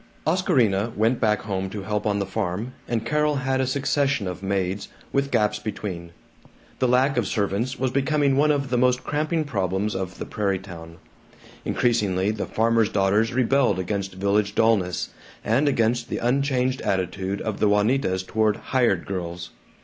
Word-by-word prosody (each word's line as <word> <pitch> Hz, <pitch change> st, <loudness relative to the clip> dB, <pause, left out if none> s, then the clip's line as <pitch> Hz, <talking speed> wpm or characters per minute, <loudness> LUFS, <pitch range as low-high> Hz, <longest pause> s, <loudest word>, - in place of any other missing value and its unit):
Oscarina 120 Hz, -, +2 dB
went 115 Hz, +4 st, +2 dB
back 105 Hz, -1 st, +1 dB
home 95 Hz, -2 st, -3 dB
to 100 Hz, 0 st, -6 dB
help 105 Hz, +1 st, -2 dB
on 100 Hz, -1 st, +1 dB
the 100 Hz, -, -1 dB
farm, 100 Hz, +4 st, -3 dB
and 115 Hz, -1 st, -1 dB
Carol 150 Hz, +3 st, +1 dB
had 130 Hz, -1 st, 0 dB
a 130 Hz, -, 0 dB
succession 140 Hz, -2 st, 0 dB
of 90 Hz, 0 st, -5 dB
maids, 95 Hz, 0 st, -2 dB, 0.3 s
with 140 Hz, 0 st, +1 dB
gaps 105 Hz, -4 st, +1 dB
between. 95 Hz, -5 st, -5 dB, 0.7 s
The 130 Hz, -, +2 dB
lack 130 Hz, +3 st, +3 dB
of -, -, +1 dB
servants 110 Hz, +5 st, -1 dB
was 130 Hz, -1 st, 0 dB
becoming 140 Hz, +1 st, +2 dB
one 150 Hz, +2 st, +3 dB
of 140 Hz, -3 st, 0 dB
the 125 Hz, -, +2 dB
most 125 Hz, 0 st, +2 dB
cramping 155 Hz, +2 st, 0 dB
problems 100 Hz, -, -1 dB
of 95 Hz, -1 st, -4 dB
the -, -, -5 dB
prairie 100 Hz, -3 st, -1 dB
town. 85 Hz, -3 st, -10 dB, 0.7 s
Increasingly 105 Hz, -5 st, +1 dB
the 110 Hz, -, -4 dB
farmers' 115 Hz, -1 st, +2 dB
daughters 105 Hz, +3 st, +2 dB
rebelled 130 Hz, -3 st, +2 dB
against 95 Hz, +1 st, -3 dB
village 100 Hz, +2 st, +1 dB
dullness, 110 Hz, -6 st, +2 dB, 0.4 s
and 135 Hz, +7 st, +3 dB
against 120 Hz, -2 st, +1 dB
the -, -, -2 dB
unchanged 130 Hz, 0 st, +1 dB
attitude 95 Hz, +1 st, -1 dB
of 110 Hz, -2 st, -4 dB
the 105 Hz, -, +3 dB
Juanitas 105 Hz, -2 st, +2 dB
toward 110 Hz, +1 st, +1 dB
"hired 120 Hz, -9 st, +1 dB
girls." 85 Hz, -2 st, -5 dB
110 Hz, 165 wpm, -24 LUFS, 95-130 Hz, 0.7 s, lack